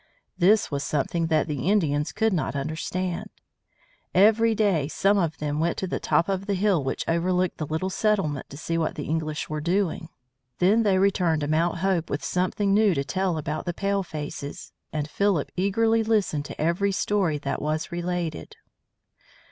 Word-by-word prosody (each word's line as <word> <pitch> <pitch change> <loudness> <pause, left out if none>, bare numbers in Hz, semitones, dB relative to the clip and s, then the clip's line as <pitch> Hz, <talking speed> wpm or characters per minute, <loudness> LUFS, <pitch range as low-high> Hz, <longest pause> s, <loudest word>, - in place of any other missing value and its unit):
This 195 +2 +3
was 140 0 -2
something 155 +4 -1
that 155 -1 +2
the 150 +2 -2
Indians 150 -7 +1
could 220 -1 +1
not 160 -4 -1
understand. 170 +5 -3 0.9
Every 220 +4 +5
day 195 -10 +2
some 195 +6 +2
of 160 -3 -1
them 150 0 -2
went 165 +2 0
to - - -2
the 185 - -3
top 170 - +2
of 195 0 -2
the 200 - +1
hill 190 -5 +2
which 135 - -3
overlooked 180 +2 0
the 155 - -3
little 160 +5 -2
settlement 190 -10 0
to 140 - -9
see 165 +2 -2
what 160 - -1
the 145 - -4
English 155 0 -2
were 155 0 -3
doing. 175 0 -1 0.5
Then 200 +6 +4
they 200 -4 +3
returned 185 -5 +2
to 145 - -1
Mount 165 +3 +1
Hope 180 -4 +1
with 145 - -3
something 190 +2 0
new 205 -3 +4
to 140 - 0
tell 185 +3 -1
about 155 0 -3
the 175 - -2
palefaces, 165 -8 -4 0.2
and 150 -1 -2
Philip 195 -2 0
eagerly 225 +5 +2
listened 210 -10 0
to - - -9
every 170 +6 +1
story 190 -5 0
that 140 -1 -3
was 155 +3 -2
related. 175 -2 -3
175 Hz, 175 wpm, -25 LUFS, 155-195 Hz, 0.9 s, Every